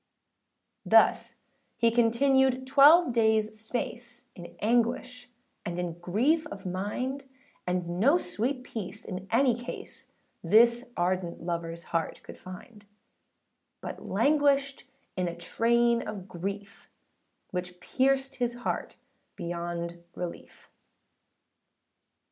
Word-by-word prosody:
Thus - - +4 0.4
he 230 0 +3
continued 260 +3 +3
twelve 285 +3 +6
daysâ 220 -2 +2
space, 240 +2 -5
In 175 -2 -11
anguish 245 +2 0 0.3
and 175 0 -4
in 175 -1 -4
grief 255 - +1
of 305 - -9
mind; 215 +9 -3 0.4
And 180 -1 -2
no 280 - +5
sweet 255 -4 -2
peace 215 -2 -7
in 185 0 -6
any 250 +2 +4
case, 240 +2 -7 0.3
This 235 +7 +4
ardent 175 -1 -1
loverâs 170 -1 -4
heart 165 -1 -3
could - - -11
find; 205 +3 -11 0.9
But - - -7
languished 280 -2 +2 0.3
in 185 -1 -1
a 170 - -4
train 235 +5 +2
of 200 -3 -6
grief, 200 +3 -6 0.6
Which 180 -1 -5
pierced 270 +6 0
his 240 -1 -1
heart 240 - -4 0.4
beyond 170 0 -5
relief. 175 -1 -8
225 Hz, 105 wpm, -28 LUFS, 180-255 Hz, 0.9 s, twelve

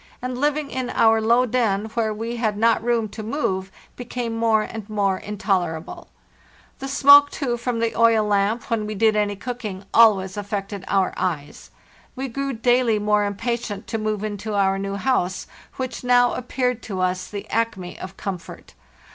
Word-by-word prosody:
and 250 0 -4
living 295 0 0
in 255 -1 -3
our 225 0 +3
low 235 +3 +4
den, 220 -4 0
where 225 -2 0
we 225 +3 -4
had 215 -3 -1
not 225 +1 +3
room 235 -2 +1
to 210 +2 -8
move, 195 -6 -2 0.2
became 245 -1 -4
more 225 -1 +2
and 220 -1 -8
more 200 -3 0
in 210 0 -7
tolerable. 175 -6 -2 0.7
Vhe 270 - -4
smoke, 285 +1 +7
too, 260 -6 -2
from 240 0 -3
the 230 0 -1
oil 230 -2 +4
lamp, 205 +3 0
when 215 -2 0
we 215 - -4
did 220 +1 +3
any 205 -1 +1
cooking, 210 -4 -6
always 200 -4 +5
affected 200 -1 -4
our 195 -2 +1
eyes. 155 -6 -4 0.5
We 265 0 -4
grew 275 +3 -3
daily 240 -1 +2
more 210 0 +2
impatient 210 0 -3
to 225 - -2
move 215 -1 -2
into 210 0 -4
our 195 -1 +2
new 195 0 -3
house, 200 -5 0 0.3
which 255 -1 -5
now 245 0 +4
appeared 250 -1 -2
to 195 -4 -5
us 185 0 -1
the 205 -1 -7
acme 220 -5 -2
of 190 +1 -8
comfort. 190 -3 -7
220 Hz, 170 wpm, -22 LUFS, 200-240 Hz, 0.7 s, smoke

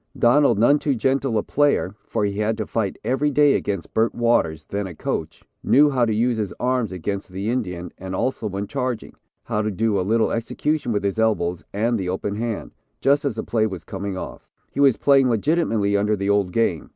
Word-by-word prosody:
Donald, 120 -1 +4
none 130 +7 +4
too 145 -2 0
gentle 130 0 0
a 105 - 0
player, 145 -9 +1
for 105 - 0
he 100 0 -2
had 110 +1 0
to 110 - -2
fight 105 -3 -2
every 135 +3 +1
day 145 0 +4
against 100 -4 -3
Bert 115 +1 +1
Waters, 100 -10 +1
then 100 0 -3
a 90 - -9
coach, - - -4 0.2
knew 145 +2 +5
how 125 -3 +2
to 110 - 0
use 115 +1 +1
his 105 -3 -2
arms 125 -4 0
against 95 +2 -4
the 95 +4 -3
Indian, 90 -8 -3
and 95 0 -5
also 125 0 -1
when 100 0 -3
charging, 125 +2 -3 0.3
how 105 - -1
to 110 - -1
do 105 0 0
a - - +1
little 110 +4 +1
execution 145 +4 -1
with 105 -2 -1
his 100 +2 -1
elbows 90 -6 0
and 115 +3 0
the 90 -2 -3
open 100 +2 -2
hand, 115 -2 -3 0.3
just 140 +2 +2
as 135 -6 -1
the - - -3
play 110 -2 +1
was 95 -4 -7
coming 95 -1 -5
off. - - -8 0.2
He - - -6
was 140 -4 +5
playing 135 -2 +4
legitimately 115 -5 +1
under 105 +1 +2
the 100 0 0
old 100 -3 +1
game. 90 -7 0
110 Hz, 210 wpm, -22 LUFS, 100-125 Hz, 0.3 s, knew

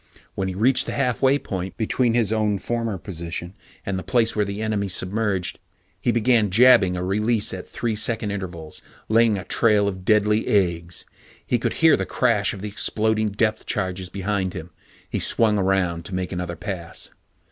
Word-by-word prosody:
When 95 - -2
he 95 - -4
reached 130 +6 +3
the - - -3
halfway 135 +1 +2
point 95 -7 -5
between 115 +1 +1
his 110 -3 +2
own 105 -2 +1
former 115 0 -2
position 85 0 -6 0.3
and 95 -1 -2
the - - -7
place 120 -3 +1
where 105 - +2
the 100 +1 -5
enemy 105 -2 -1
submerged, 95 0 -2 0.4
he 120 - +2
began 115 -2 +3
jabbing 110 -3 +5
a 90 - -3
release 105 +3 0
at 95 - -7
three 115 -2 -2
second 110 -1 0
intervals, 85 -6 -6 0.3
laying 115 -1 +4
a 95 - -5
trail 105 -3 +3
of 95 -2 -4
deadly 105 +2 +2
eggs. 85 -4 0 0.4
He - - +1
could - - -1
hear - - +8
the - - -3
crash - - +1
of 95 - -8
the - - -3
exploding 110 +1 0
depth 110 +1 -1
charges 95 -2 -2
behind 95 -1 -2
him. 85 +2 -7 0.4
He - - -3
swung 110 -3 +3
around 90 -3 0
to 95 - -5
make 90 -1 -3
another 90 -2 -4
pass. 90 -2 -6
100 Hz, 180 wpm, -23 LUFS, 95-110 Hz, 0.4 s, hear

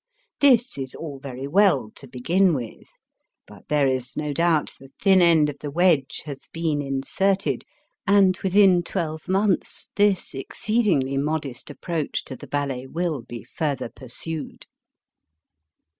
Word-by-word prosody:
This 255 - +4
is 130 -1 -5
all 145 -4 -7
very 135 0 -6
well 150 - +3
to 135 - -12
begin 170 +9 +2
with. 120 -5 -7 0.6
But - - -16
there 145 -2 +2
is 130 0 -2
no 150 -1 -2
doubt 165 0 +2
the 135 - -14
thin 190 -2 +5
end 165 -3 +5
of 145 -1 -6
the 150 - -5
wedge 150 -3 +2
has 140 -3 -8
been 160 -3 -1
inserted, 145 +9 -1 0.4
and 195 -2 +5
within 190 -2 +4
twelve 165 -2 -4
months 195 0 0
this 205 -3 +2
exceedingly 140 - 0
modest 145 -3 -3
approach 155 +1 -3
to 130 - -7
the - - -11
ballet 135 -3 -3
will 165 -2 -2
be 120 0 -9
further 140 -6 -3
pursued. 145 +6 -7
150 Hz, 140 wpm, -24 LUFS, 135-185 Hz, 0.6 s, thin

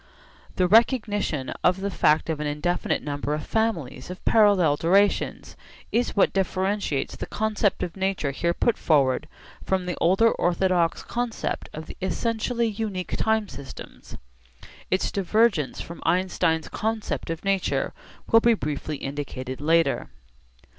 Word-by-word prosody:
The 180 - +2
recognition 205 - +2
of 180 +1 +3
the 200 0 -2
fact 155 -3 +3
of 160 -2 -2
an 150 - -2
indefinite 150 +4 -1
number 145 0 -2
of 150 - -6
families 175 - -2
of 180 - -9
parallel 200 -9 +4
durations 195 +6 +1 0.4
is 240 +1 0
what 200 - +3
differentiates 190 -5 -1
the - - -6
concept 215 -1 0
of 170 - -5
nature 190 -7 -1
here 170 +5 -1
put 235 - +1
forward 145 -1 +2 0.4
from 190 -1 0
the 180 -1 -2
older 195 +7 +4
orthodox 175 -1 +1
concept 240 -1 -3
of 155 +1 -7
the - - -10
essentially 230 +4 -1
unique 205 -4 -3
time 220 -1 +1
systems. 140 -6 -10 0.7
Its 185 - 0
divergence 200 - +1
from 170 - -9
Einstein's 180 -3 +1
concept 220 -4 -3
of 165 +3 -4
nature 195 -1 0 0.3
will 225 - +5
be 235 0 +4
briefly 150 -3 -4
indicated 135 -2 -5
later. 165 +2 +2
185 Hz, 135 wpm, -25 LUFS, 155-210 Hz, 0.7 s, will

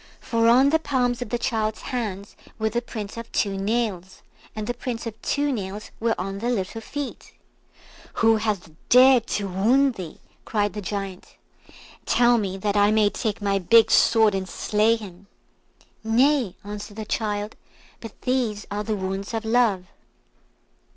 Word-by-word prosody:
For 230 -1 +1
on 260 +4 +5
the 320 - +3
palms 250 -5 0
of 245 - -4
the 240 - 0
child's 220 -3 -2
hands 210 -6 -4 0.2
were 220 -1 -1
the 240 +2 -1
prints 215 -3 -7
of 230 0 -8
two 200 -2 0
nails, 195 -3 -2 0.3
and 215 -1 -4
the 245 - -2
prints 240 -1 -5
of 225 -1 -7
two 290 0 0
nails 205 -3 -5
were 230 -3 0
on 195 +2 -4
the 235 +3 -2
little 225 -1 -2
feet. 285 +4 -7 0.8
"Who 225 -1 +3
hath 210 -6 -2 0.2
dared 255 -1 +6
to 200 -1 -2
wound 240 +9 +3
thee?" 180 -7 -8 0.2
cried 205 -2 -1
the 210 - -5
Giant; 195 -2 -6 0.7
"tell 240 -1 +4
me, 195 -2 -3
that 205 +1 -1
I 205 0 +4
may 215 -1 +3
take 215 -3 -3
my 200 -1 +1
big 225 +5 +5
sword 220 -2 +5
and 190 -1 -3
slay 215 +5 +2
him." 200 -3 -11 0.8
"Nay!" 245 -1 +2
answered 205 +1 -8
the 215 - -5
child; 210 -1 -2 0.4
"but 225 -3 -11
these 240 -5 -1
are 205 +1 -2
the 215 0 -2
wounds 195 +2 -4
of 225 0 -3
Love." 220 -5 +2
215 Hz, 165 wpm, -24 LUFS, 200-235 Hz, 0.8 s, dared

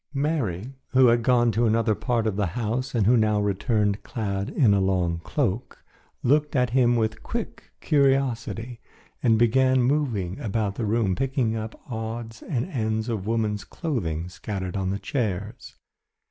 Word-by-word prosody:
Mary, 135 - -1 0.2
who 130 0 +6
had 120 0 +3
gone 120 -1 +3
to 115 +2 +2
another 110 0 +2
part 115 +1 -1
of 110 -3 0
the 105 -1 0
house 120 +3 -2
and 110 -4 +2
who 120 +4 +5
now 110 -2 +3
returned 105 0 0
clad 100 -3 -3
in 115 -8 +3
a 100 - +3
long 90 -3 +1
cloak, 125 - -2 0.4
looked 150 +3 +2
at 125 -3 +2
him 120 -1 +4
with 110 -1 -1
quick 235 -1 -5
curiosity, 130 -5 +1 0.4
and 115 -2 +4
began 130 +3 +4
moving 120 -9 0
about 105 -2 -1
the 115 - -3
room 105 -3 +1
picking 130 -1 0
up 110 0 -5
odds 115 -1 -5
and 125 -6 -2
ends 110 -8 -2
of 105 -4 -3
woman's 110 -2 0
clothing 90 - -3
scattered 95 0 -5
on 95 -1 -1
the 100 - -1
chairs. 105 -2 -3
115 Hz, 160 wpm, -25 LUFS, 105-125 Hz, 0.4 s, who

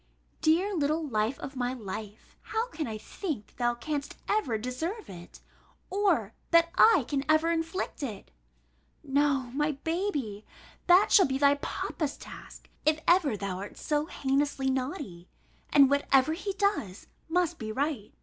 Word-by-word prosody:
Dear 355 +6 +3
little 310 0 0
life 220 +1 0
of 270 - -8
my 250 0 -1
life! 215 -1 -8
how 450 +2 -2
can 315 -10 -4
I 220 -1 -4
think 250 - -6
thou 240 -1 +1
canst 285 +3 -4
ever 340 - +1
deserve 285 - -4
it, 175 -1 -12 0.5
or 360 - +1 0.2
that 335 0 +5
I 365 - +6
can 275 -2 -1
ever 315 +2 +4
inflict 330 +1 -2
it? 220 - -6 0.7
No, 275 -3 +1
my 295 +2 +1
baby, 300 - -2 0.4
that 360 +3 +6
shall 385 - +7
be 265 0 -1
thy 280 0 +5
papa's 285 +1 -3
task, - - -12 0.2
if 310 +1 +3
ever 330 - +4
thou 190 -2 -4
art 200 - -8
so 300 0 -1
heinously 270 -1 0
naughty; 255 - -4 0.4
and 280 -2 +7
whatever 280 +1 +3
he 385 +4 -4
does, 385 - -1 0.2
must 345 0 +1
be 220 -1 -4
right. 265 -3 -2
285 Hz, 150 wpm, -29 LUFS, 240-330 Hz, 0.7 s, shall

